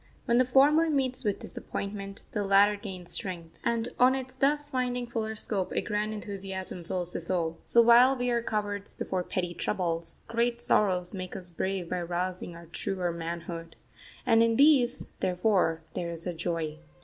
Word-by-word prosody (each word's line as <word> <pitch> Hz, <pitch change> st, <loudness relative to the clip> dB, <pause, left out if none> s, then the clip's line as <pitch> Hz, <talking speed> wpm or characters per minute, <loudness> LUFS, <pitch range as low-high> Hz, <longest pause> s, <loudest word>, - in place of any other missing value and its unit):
When 235 Hz, -1 st, +3 dB
the 255 Hz, -, +5 dB
former 290 Hz, +6 st, +5 dB
meets 265 Hz, -4 st, 0 dB
with 205 Hz, -3 st, 0 dB
disappointment, 200 Hz, 0 st, -6 dB
the 210 Hz, -, -1 dB
latter 200 Hz, +1 st, +5 dB
gains 190 Hz, -4 st, -8 dB
strength, 170 Hz, -4 st, -3 dB
and 235 Hz, 0 st, 0 dB
on 255 Hz, +1 st, +6 dB
its 260 Hz, -1 st, -5 dB
thus 290 Hz, +2 st, +1 dB
finding 250 Hz, -2 st, -1 dB
fuller 220 Hz, -2 st, -3 dB
scope 200 Hz, -3 st, -2 dB
a -, -, +1 dB
grand 210 Hz, +1 st, -1 dB
enthusiasm 195 Hz, -3 st, -5 dB
fills 180 Hz, +1 st, -3 dB
the -, -, -3 dB
soul. 165 Hz, -1 st, -2 dB
So 235 Hz, -, +6 dB
while 245 Hz, +3 st, +7 dB
we 245 Hz, 0 st, 0 dB
are 235 Hz, -1 st, +1 dB
cowards 205 Hz, -3 st, -3 dB
before 185 Hz, -, -2 dB
petty 180 Hz, -1 st, -2 dB
troubles, 170 Hz, -3 st, -1 dB
great 235 Hz, +1 st, 0 dB
sorrows 185 Hz, -5 st, +2 dB
make 185 Hz, -2 st, -6 dB
us 180 Hz, -1 st, -3 dB
brave 190 Hz, +1 st, -2 dB
by 180 Hz, -1 st, -1 dB
rousing 175 Hz, 0 st, -3 dB
our 170 Hz, 0 st, -11 dB
truer 180 Hz, +1 st, -2 dB
manhood. 170 Hz, 0 st, -6 dB, 0.5 s
And 225 Hz, 0 st, +5 dB
in 230 Hz, 0 st, +3 dB
these, 270 Hz, -3 st, +4 dB
therefore, 180 Hz, -3 st, +1 dB
there 170 Hz, -, -3 dB
is 165 Hz, 0 st, -5 dB
a 180 Hz, -, -2 dB
joy. 165 Hz, -2 st, -3 dB
200 Hz, 175 wpm, -29 LUFS, 175-235 Hz, 0.5 s, while